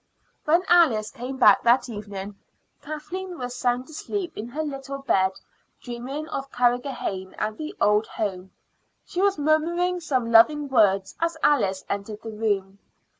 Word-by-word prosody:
When 335 +4 +3
Alice 265 -12 +4
came 260 +1 -6
back 210 -6 +6
that 240 +3 +3
evening 205 -3 -7 0.5
Kathleen 350 +5 -6
was 245 -2 -5
sound 250 0 0
asleep 345 +3 -5
in 215 - -5
her 295 +6 -4
little 275 -2 -5
bed, 190 -8 +1 0.5
dreaming 260 +5 -6
of 275 -3 -5
Carrigrohane 245 -6 -1
and 215 - -2
the 310 - -6
old 210 +1 +3
home. 190 -3 -4 0.6
She 360 - -3
was 400 0 +3
murmuring 340 +4 +1
some 255 -8 -1
loving 290 +6 +5
words 195 -6 +3
as 335 -1 -1
Alice 195 -10 +2
entered 205 +2 -5
the 225 - -6
room. 200 -3 -2
250 Hz, 145 wpm, -25 LUFS, 210-305 Hz, 0.6 s, back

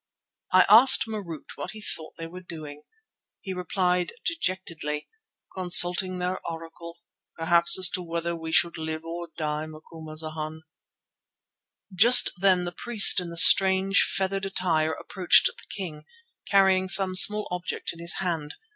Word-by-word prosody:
I 185 0 +4
asked 235 +6 +6
Marût 200 -9 -9
what 145 - -8
he 220 - -12
thought 160 -6 -6
they 165 - -8
were 180 +3 -12
doing. 155 -4 -12 0.6
He 190 - -8
replied 180 0 -3
dejectedly: 180 - -5 0.5
"Consulting 180 0 +3
their 180 +1 -5
Oracle; 165 +1 -11 0.4
perhaps 170 +1 +2
as 185 0 +5
to 185 - -6
whether 170 0 -5
we 160 -1 -9
should 170 0 0
live 160 0 -7
or 170 +1 -8
die, 155 -1 -5
Macumazana." 155 0 -9 1.3
Just 235 +7 +5
then 185 -1 0
the 175 - -6
priest 215 +2 +3
in 180 -1 -7
the 170 - -10
strange, 190 +2 +5
feathered 195 0 -3
attire 160 -5 -2
approached 185 +1 +1
the - - -5
king, 155 -6 -9 0.4
carrying 190 -1 +1
some 190 -1 +3
small 210 +3 +5
object 180 0 -6
in 165 - -17
his 170 0 -1
hand. 165 -5 -5
175 Hz, 140 wpm, -24 LUFS, 160-190 Hz, 1.3 s, asked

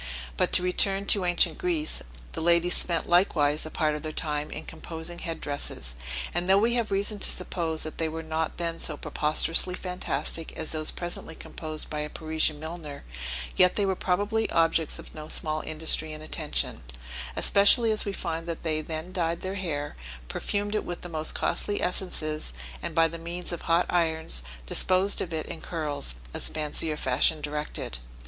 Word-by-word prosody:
But - - +2
to - - +7
return 195 +2 +3
to 200 -2 +5
ancient 175 - +3
Greece; 340 -5 0 0.3
the - - -4
ladies 170 +1 +4
spent 170 -2 +2
likewise 155 -4 +3
a - - -6
part 155 -1 +1
of 150 - -4
their 155 - -4
time 150 -1 -2
in - - -6
composing 165 +1 -6
head 165 -2 -4
dresses, 145 - -2 0.4
and 175 +1 0
though 195 - +7
we 230 +4 +3
have 235 -3 +1
reason 200 +1 0
to - - +1
suppose 165 -3 -2
that 155 - -6
they 160 -1 +1
were 160 +1 -5
not 160 0 -2
then 165 -1 -2
so 150 - 0
preposterously 165 +5 +2
fantastic 165 -4 0
as 160 - -4
those 155 -1 -1
presently 175 -2 -2
composed 155 -1 -5
by 150 - -2
a 150 0 -2
Parisian 155 -1 0
milliner, 160 -2 -7 0.5
yet 180 0 +6
they 205 - +2
were 190 -1 +1
probably 205 +5 +1
objects 165 -1 +2
of - - -11
no 155 0 -8
small 155 0 -1
industry 155 0 0
and 155 0 -8
attention, 155 -1 -1 0.5
especially 220 +3 +5
as 215 - +4
we 200 - -2
find 165 -3 -3
that 165 -1 -4
they 155 -2 0
then 160 +3 -5
dyed 170 -2 0
their 190 +1 -3
hair, 155 -7 -3 0.3
perfumed 205 - -1
it 215 - 0
with 175 - -5
the 175 - -7
most 155 -1 -1
costly 205 - +1
essences, 155 - -1 0.3
and 165 - -4
by 165 -1 +6
the 165 +1 -6
means 170 +2 -4
of 170 - -4
hot 170 +1 +3
irons 160 - +2 0.2
disposed 185 - +2
of 170 - -3
it 160 -1 -2
in 165 - -7
curls, 145 - -2 0.2
as - - 0
fancy 155 +1 -1
or 150 - -2
fashion 130 +4 +3
directed. 150 - -3
165 Hz, 185 wpm, -28 LUFS, 155-180 Hz, 0.5 s, to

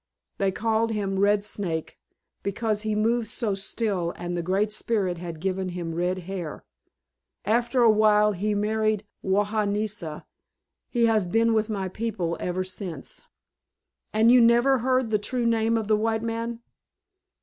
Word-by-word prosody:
They 195 -1 +2
called 225 +2 0
him 200 -3 -1
'Red 205 +1 +3
Snake' 170 -7 -4 0.4
because 210 +1 -1
he 215 -1 -1
moved 225 +2 +1
so 215 -1 -2
still 195 -3 -2
and 175 0 -4
the 175 - -1
Great 195 +5 0
Spirit 200 -5 -1
had 170 -2 -6
given 190 +1 -2
him 175 -2 -4
red 180 +2 0
hair. 180 -5 -6 0.8
After 240 +4 +2
a 225 - +7
while 210 0 +4
he 205 +2 -1
married 215 0 0 0.2
Wahahnesha. 205 -3 -1 0.6
He 235 -2 +2
has 215 -5 +2
been 225 +4 +2
with 220 0 +1
my 195 -3 -2
people 185 -4 -3
ever 180 +1 -2
since." 185 -5 -7 0.9
"And 220 +2 +4
you 250 0 +7
never 240 +3 +5
heard 255 -1 +1
the 210 - +2
true 240 +3 -2
name 230 0 +2
of 220 -2 -2
the 215 0 +3
white 220 +1 0
man?" 230 0 -3
210 Hz, 150 wpm, -26 LUFS, 190-225 Hz, 0.9 s, a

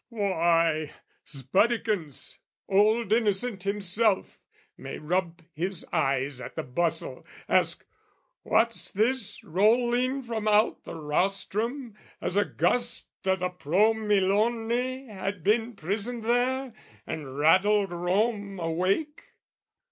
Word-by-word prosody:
Why, 165 -7 +1 0.4
'sbuddikins, 170 - 0 0.3
old 210 +2 +3
Innocent 215 -1 +1
himself 200 +1 0 0.3
May - - -7
rub 170 +1 -2
his 180 +3 -2
eyes 135 -1 0
at - - -8
the - - -3
bustle, 165 +5 -2 0.2
ask - - +1 0.6
"What's 230 +2 +1
this 215 0 0
"Rolling 240 - +2
from 225 -3 -3
out 215 +1 +2
the - - -7
rostrum, 200 - -2 0.3
as 185 - -3
a 205 - +3
gust 240 -1 0 0.2
"O' 190 - +4
the 180 -1 -2
Pro 180 +5 +2
Milone 215 +2 +1 0.4
had 195 -4 -5
been 225 +4 +1
prisoned 210 +7 -3
there, 250 +2 0 0.3
"And 140 -4 -6
rattled 190 +6 +4
Rome 200 +3 -1
awake?" 185 - -1
200 Hz, 105 wpm, -27 LUFS, 175-225 Hz, 0.6 s, O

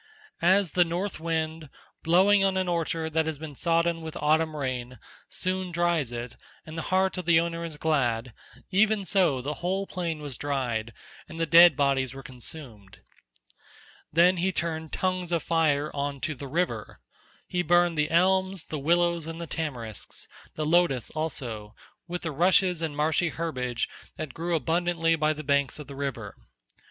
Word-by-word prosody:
As 185 0 +4
the 180 - +4
north 175 +3 -3
wind, 160 -2 -2 0.3
blowing 195 +4 +4
on 190 -1 +2
an 185 -1 0
orchard 165 -2 -1
that 160 0 +1
has 160 -2 -2
been 155 0 -8
sodden 170 +2 +1
with 160 -1 -7
autumn 155 +1 +2
rain, 125 -3 -4 0.3
soon 185 0 -1
dries 170 -6 +1
it, 120 0 -6 0.3
and 155 - -9
the 165 - -3
heart 190 0 +2
of 180 - -5
the 170 -1 +5
owner 170 0 -2
is 160 -3 -6
glad—even 155 - 0
so 170 -10 +2
the 145 +3 -2
whole 190 +3 -1
plain 170 -5 -3
was 145 -4 -5
dried 125 -6 -2 0.4
and 165 - -8
the 165 - +2
dead 170 0 +8
bodies 135 -2 +1
were 135 - -9
consumed. 120 -6 -9 1.1
Then 175 +3 +5
he 185 +2 +1
turned 160 -3 -3
tongues 185 -2 -1
of 170 -2 0
fire 155 -3 +1
on 140 -1 -3
to 155 - -1
the 140 0 -8
river. 175 +6 -2 0.5
He 180 -1 -1
burned 175 0 +3
the 150 0 +1
elms 190 +1 +2
the 155 - -5
willows 170 +2 +2
and 165 0 -6
the 170 - -4
tamarisks, 125 - -5 0.3
the 155 - -2
lotus 160 -7 +2
also, 120 -9 -4 0.3
with 180 0 -5
the 160 - -2
rushes 180 +2 +3
and 155 -3 -3
marshy 160 +3 +2
herbage 130 -8 -2 0.3
that 155 -4 -5
grew 170 +1 -1
abundantly 165 0 +1
by 155 -1 +1
the 155 0 -7
banks 140 -1 +1
of 150 - -8
the 140 +1 -10
river. 130 -7 -4
160 Hz, 165 wpm, -27 LUFS, 140-175 Hz, 1.1 s, dead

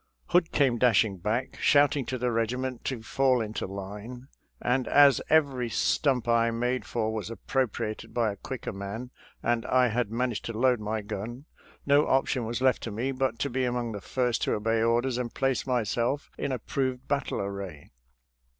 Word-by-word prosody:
Hood 175 -1 +3
came 130 -5 +2
dashing 110 -5 +3
back, 110 +8 -2
shouting 145 -3 +4
to 130 - -2
the 125 0 0
regiment 125 +3 -2
to 125 -4 -3
fall 130 +1 +2
into 110 -3 -3
line, 105 +7 -8 0.3
and 125 +1 0
as 140 -3 +6
every 140 -6 +3
stump 125 +1 +1
I 115 0 +3
made 125 +2 -1
for 110 -2 -1
was 110 -2 -4
appropriated 115 -2 -2
by 115 -3 +1
a - - -6
quicker 125 +4 -6
man, 100 +6 -6 0.3
and 120 -1 +1
I 125 -1 +4
had 115 -1 0
managed 120 0 -2
to 115 -2 -4
load 125 0 +3
my 110 +1 -2
gun, 110 +6 -6 0.4
no 145 +1 +4
option 130 -3 +1
was 120 +2 -3
left 130 -2 +2
me 115 +6 -2
but 130 -2 -1
to 140 - 0
be 130 +1 0
among 120 -2 -1
the 100 -2 -6
first 125 0 -1
to - - +1
obey 115 +1 +1
orders 120 +2 +1
and 120 -2 -3
place 135 -1 0
myself 120 +3 0
in 140 - -3
approved 130 +1 -2
battle 140 0 -1
array. 100 -6 -6
120 Hz, 175 wpm, -28 LUFS, 110-130 Hz, 0.4 s, as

